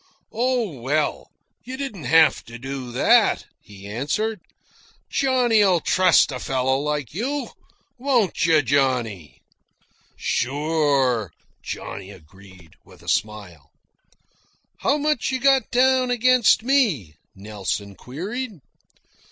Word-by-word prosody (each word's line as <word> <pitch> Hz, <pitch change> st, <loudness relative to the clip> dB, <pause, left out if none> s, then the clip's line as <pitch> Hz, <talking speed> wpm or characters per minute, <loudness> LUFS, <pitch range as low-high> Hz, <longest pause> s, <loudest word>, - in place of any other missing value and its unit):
"Oh, 235 Hz, -, -1 dB
well, 145 Hz, +5 st, -1 dB, 0.3 s
you 255 Hz, +2 st, -7 dB
didn't 265 Hz, -, -6 dB
have 160 Hz, -1 st, +4 dB
to 115 Hz, 0 st, -10 dB
do 130 Hz, 0 st, -6 dB
that," 120 Hz, -, +3 dB, 0.2 s
he 100 Hz, -1 st, -13 dB
answered. 150 Hz, -, -2 dB, 0.7 s
"Johnny'll 235 Hz, -9 st, +3 dB
trust 185 Hz, -2 st, +3 dB
a 130 Hz, -, -5 dB
fellow 130 Hz, +1 st, 0 dB
like 145 Hz, -3 st, -3 dB
you 270 Hz, -, -3 dB, 0.5 s
won't 245 Hz, -8 st, +1 dB
you, 160 Hz, -3 st, +4 dB
Johnny!" 125 Hz, -, -1 dB, 0.7 s
"Sure," 140 Hz, -, 0 dB, 0.3 s
Johnny 95 Hz, -1 st, -7 dB
agreed, 95 Hz, -2 st, -16 dB
with -, -, -18 dB
a -, -, -17 dB
smile. 95 Hz, -6 st, -3 dB, 1.1 s
"How 285 Hz, -, +1 dB
much 300 Hz, -3 st, 0 dB
you 260 Hz, -, -1 dB
got 270 Hz, 0 st, +3 dB
down 255 Hz, 0 st, +3 dB
against 245 Hz, -2 st, +3 dB
me?" 220 Hz, -, +1 dB, 0.2 s
Nelson 100 Hz, 0 st, -5 dB
queried. 195 Hz, -, -6 dB
150 Hz, 105 wpm, -22 LUFS, -, 1.1 s, have